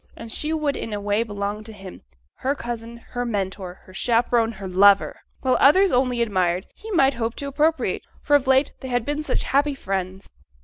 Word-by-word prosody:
And 230 Hz, 0 st, -8 dB
she 305 Hz, +6 st, 0 dB
would 305 Hz, -3 st, 0 dB
in 225 Hz, -, -5 dB
a 205 Hz, -, -2 dB
way 205 Hz, +2 st, 0 dB
belong 205 Hz, -1 st, -4 dB
to 220 Hz, -, -10 dB
him: 195 Hz, -3 st, -11 dB, 0.4 s
her 275 Hz, +2 st, -1 dB
cousin, 235 Hz, -2 st, -6 dB
her 245 Hz, 0 st, -3 dB
mentor, 195 Hz, -5 st, -3 dB
her 185 Hz, -, -15 dB
chaperon, 230 Hz, +1 st, +1 dB
her 195 Hz, -2 st, -7 dB
lover! 195 Hz, +2 st, +4 dB, 0.2 s
While 255 Hz, -1 st, +2 dB
others 375 Hz, +7 st, +6 dB
only 250 Hz, -1 st, +2 dB
admired, 185 Hz, -4 st, 0 dB
he 440 Hz, -, -11 dB
might 280 Hz, -9 st, +3 dB
hope 230 Hz, -1 st, -3 dB
to 280 Hz, -, -5 dB
appropriate; 310 Hz, +4 st, 0 dB, 0.2 s
for 290 Hz, -, +3 dB
of 280 Hz, -2 st, +2 dB
late 265 Hz, +2 st, +4 dB
they 260 Hz, -, -7 dB
had 245 Hz, -2 st, -1 dB
been 295 Hz, +1 st, -2 dB
such 300 Hz, -, -1 dB
happy 285 Hz, +1 st, +1 dB
friends! 190 Hz, -4 st, -4 dB
235 Hz, 200 wpm, -23 LUFS, 200-275 Hz, 0.4 s, others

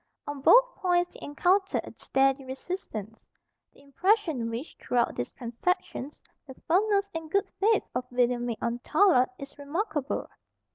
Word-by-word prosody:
On 290 Hz, -1 st, -6 dB
both -, -, +6 dB
points 355 Hz, -1 st, +1 dB
he -, -, -13 dB
encountered 375 Hz, +7 st, +1 dB
a -, -, -10 dB
steady 270 Hz, 0 st, +2 dB
resistance. 260 Hz, -, -6 dB, 0.5 s
The -, -, -21 dB
impression 320 Hz, -, +1 dB
which, 235 Hz, +7 st, -6 dB
throughout 240 Hz, -1 st, +1 dB
these 120 Hz, -, -3 dB
transactions, 275 Hz, +4 st, -3 dB, 0.2 s
the 265 Hz, -, -10 dB
firmness 400 Hz, +3 st, +3 dB
and 325 Hz, -1 st, -5 dB
good 395 Hz, +4 st, +1 dB
faith 425 Hz, +1 st, +3 dB
of 250 Hz, 0 st, -2 dB
William 245 Hz, -1 st, +1 dB
made 230 Hz, -2 st, -2 dB
on 235 Hz, +1 st, -1 dB
Tallard 300 Hz, -2 st, +4 dB
is 275 Hz, 0 st, -10 dB
remarkable. 295 Hz, 0 st, -2 dB
285 Hz, 145 wpm, -28 LUFS, 250-370 Hz, 0.5 s, both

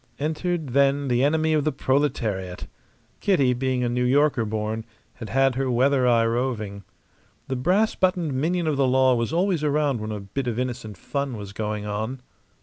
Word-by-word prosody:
Entered 160 Hz, +1 st, -2 dB
then 140 Hz, +1 st, +2 dB
the 125 Hz, +1 st, +2 dB
enemy 160 Hz, +2 st, +2 dB
of 150 Hz, -2 st, +2 dB
the 155 Hz, -, +1 dB
proletariat. 115 Hz, -10 st, -1 dB, 0.5 s
Kitty, 140 Hz, -11 st, +3 dB
being 130 Hz, 0 st, -1 dB
a -, -, +1 dB
New 125 Hz, +1 st, 0 dB
Yorker 135 Hz, -1 st, +3 dB
born, 110 Hz, +1 st, -3 dB, 0.3 s
had 115 Hz, -, -9 dB
had 135 Hz, +1 st, +3 dB
her 130 Hz, +1 st, -1 dB
weather 130 Hz, +1 st, +3 dB
eye 115 Hz, -2 st, +4 dB
roving. 115 Hz, -4 st, -2 dB, 0.7 s
The 130 Hz, -, -1 dB
brass 185 Hz, +12 st, +2 dB
buttoned 180 Hz, -5 st, 0 dB
minion 165 Hz, +6 st, 0 dB
of 155 Hz, -3 st, 0 dB
the 135 Hz, -1 st, +3 dB
law 130 Hz, 0 st, +4 dB
was 115 Hz, +1 st, -1 dB
always 175 Hz, -1 st, +1 dB
around 145 Hz, -5 st, +1 dB
when 110 Hz, 0 st, -4 dB
a 105 Hz, -, -4 dB
bit 105 Hz, +7 st, -4 dB
of 115 Hz, -2 st, -2 dB
innocent 125 Hz, -5 st, -4 dB
fun 140 Hz, -, -3 dB
was 100 Hz, -1 st, -8 dB
going 105 Hz, 0 st, -3 dB
on. 110 Hz, +5 st, -4 dB
130 Hz, 180 wpm, -24 LUFS, 115-145 Hz, 0.7 s, eye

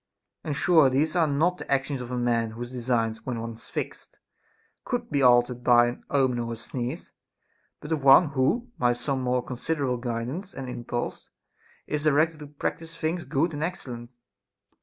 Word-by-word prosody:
And 150 Hz, -, -2 dB
sure 160 Hz, -2 st, +5 dB
these 150 Hz, +6 st, +1 dB
are 165 Hz, -3 st, +4 dB
not 165 Hz, +6 st, +1 dB
the -, -, -7 dB
actions 140 Hz, -1 st, 0 dB
of 120 Hz, -, -7 dB
a 125 Hz, -, -3 dB
man 120 Hz, -2 st, +1 dB
whose 120 Hz, +2 st, -7 dB
designs, 115 Hz, -3 st, -1 dB
when 125 Hz, -3 st, -3 dB
once 115 Hz, 0 st, -7 dB
fixed, -, -, -6 dB, 0.7 s
could -, -, -3 dB
be 140 Hz, -1 st, +1 dB
altered 120 Hz, -1 st, +4 dB
by 120 Hz, -1 st, +6 dB
an 120 Hz, -, -8 dB
omen 130 Hz, -3 st, +2 dB
or 115 Hz, 0 st, -3 dB
a -, -, -4 dB
sneeze; 120 Hz, +2 st, -5 dB, 0.7 s
but 150 Hz, -, -8 dB
of 155 Hz, -3 st, 0 dB
one 140 Hz, +4 st, +7 dB
who, 155 Hz, -, 0 dB
by 120 Hz, -1 st, +3 dB
some 130 Hz, +2 st, -2 dB
more 125 Hz, 0 st, 0 dB
con 125 Hz, -, -6 dB
siderable 135 Hz, -4 st, -1 dB
guidance 125 Hz, -, -4 dB
and 135 Hz, -1 st, -5 dB
impulse, 120 Hz, -1 st, -4 dB, 0.6 s
is 150 Hz, 0 st, -2 dB
directed 155 Hz, +1 st, +3 dB
to 150 Hz, -, -8 dB
practise 165 Hz, +3 st, -5 dB
things 170 Hz, +2 st, -2 dB
good 160 Hz, +5 st, 0 dB
and 145 Hz, -, -4 dB
excellent. 125 Hz, -9 st, -5 dB
130 Hz, 180 wpm, -26 LUFS, 120-150 Hz, 0.7 s, one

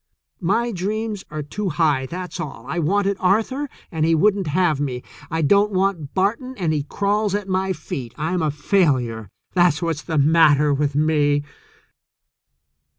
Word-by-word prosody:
My 225 Hz, +7 st, 0 dB
dreams 210 Hz, +2 st, -3 dB
are 150 Hz, 0 st, -4 dB
too 195 Hz, +7 st, -3 dB
high, 150 Hz, -5 st, +1 dB
that's 180 Hz, +4 st, -6 dB
all. 130 Hz, -6 st, -6 dB
I 160 Hz, +5 st, -2 dB
wanted 200 Hz, +4 st, +1 dB
Arthur, 225 Hz, +10 st, +1 dB, 0.2 s
and 160 Hz, -2 st, -1 dB
he 165 Hz, +1 st, +3 dB
wouldn't 195 Hz, +2 st, +2 dB
have 155 Hz, -1 st, +1 dB
me. 130 Hz, -4 st, -3 dB, 0.3 s
I 160 Hz, 0 st, -1 dB
don't 200 Hz, +7 st, +4 dB
want 185 Hz, -6 st, -1 dB
Barton, 230 Hz, +7 st, 0 dB
and 170 Hz, -4 st, 0 dB
he 150 Hz, -, 0 dB
crawls 205 Hz, +6 st, 0 dB
at 205 Hz, -1 st, -3 dB
my 190 Hz, 0 st, 0 dB
feet. 135 Hz, -8 st, -6 dB
I'm 165 Hz, +3 st, -1 dB
a 155 Hz, -, +1 dB
failure, 135 Hz, -, 0 dB, 0.2 s
that's 175 Hz, -4 st, +3 dB
what's 165 Hz, -2 st, -2 dB
the 160 Hz, -2 st, -3 dB
matter 150 Hz, -1 st, +4 dB
with 145 Hz, 0 st, 0 dB
me." 145 Hz, -1 st, +2 dB
165 Hz, 155 wpm, -21 LUFS, 150-200 Hz, 0.3 s, don't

